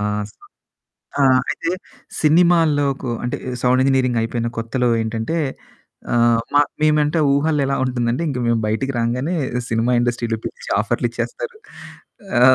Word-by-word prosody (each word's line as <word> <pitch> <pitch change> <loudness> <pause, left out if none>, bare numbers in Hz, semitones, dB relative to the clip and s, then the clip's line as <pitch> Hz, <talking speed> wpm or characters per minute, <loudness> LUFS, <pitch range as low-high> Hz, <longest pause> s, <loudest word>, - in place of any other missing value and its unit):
ఆహ్, 105 0 -1
సో - - -38 0.8
ఆహ్, 130 -1 +5
అయితే 165 +3 -3 0.5
సినిమాల్లోకు 150 -5 +3
అంటే 125 - -2 0.3
సౌండ్ 125 +1 +3
ఇంజినీరింగ్ 130 -3 +2
అయిపోయిన 115 +1 -2
కొత్తలో 120 +2 0
ఏంటంటే 110 +8 -2 0.8
ఆహ్, 120 -1 +4
మ - - +5 0.2
మేమంటే 150 +1 +3
ఊహల్లో 145 +1 +1
ఎలా 135 - 0
ఉంటుందంటే 125 +3 -1
ఇంక 135 - -3
మేము 115 -1 +2
బయటికి 135 +6 -1
రాంగానే 125 +9 -1 0.3
సినిమా 115 +2 +1
ఇండస్ట్రీలో 120 -1 -1
పిలిచి 485 0 -7
ఆఫర్‌లిచ్చేస్తారు. 485 -2 -3 0.8
ఆ! - - +3
130 Hz, 125 wpm, -20 LUFS, 120-150 Hz, 0.8 s, ఆహ్